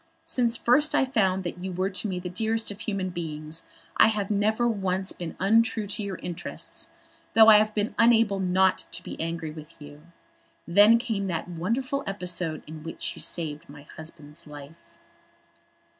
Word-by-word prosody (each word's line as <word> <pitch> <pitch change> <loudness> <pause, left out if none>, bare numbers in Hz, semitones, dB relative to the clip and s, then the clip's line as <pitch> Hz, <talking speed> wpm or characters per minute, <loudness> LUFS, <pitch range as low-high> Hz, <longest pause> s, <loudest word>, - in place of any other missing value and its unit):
Since 235 -2 +1
first 295 +7 +3
I - - +4
found 190 -7 +1
that 175 0 -5
you 190 - -3
were 185 +2 -1
to 200 +3 -1
me 185 -2 -3
the 180 - -6
dearest 220 +4 -1
of 205 - -9
human 195 -3 -3
beings 155 -2 -5 0.3
I - - +7
have 210 -2 -1
never 215 +3 +2
once 190 -4 -1
been 170 -2 -7
untrue 225 +2 +3
to 205 +1 -2
your 200 -2 -4
interests, 175 -2 -7 0.5
though 225 0 +9
I 210 -1 +9
have 215 0 0
been 210 0 -1
unable 230 -4 +4
not 185 0 +2
to 170 +1 -5
be - - -7
angry 165 -1 -3
with 155 +1 -12
you. 145 0 -12 0.7
Then 205 +6 +7
came 225 -5 -2
that 170 -2 -3
wonderful 230 +11 -2
episode 180 -5 -3
in 155 0 -9
which 165 +1 -4
you - - -10
saved 150 -4 -4
my 145 0 -12
husband's 155 -2 -11
life." 145 +2 -12
190 Hz, 175 wpm, -26 LUFS, 165-220 Hz, 0.7 s, though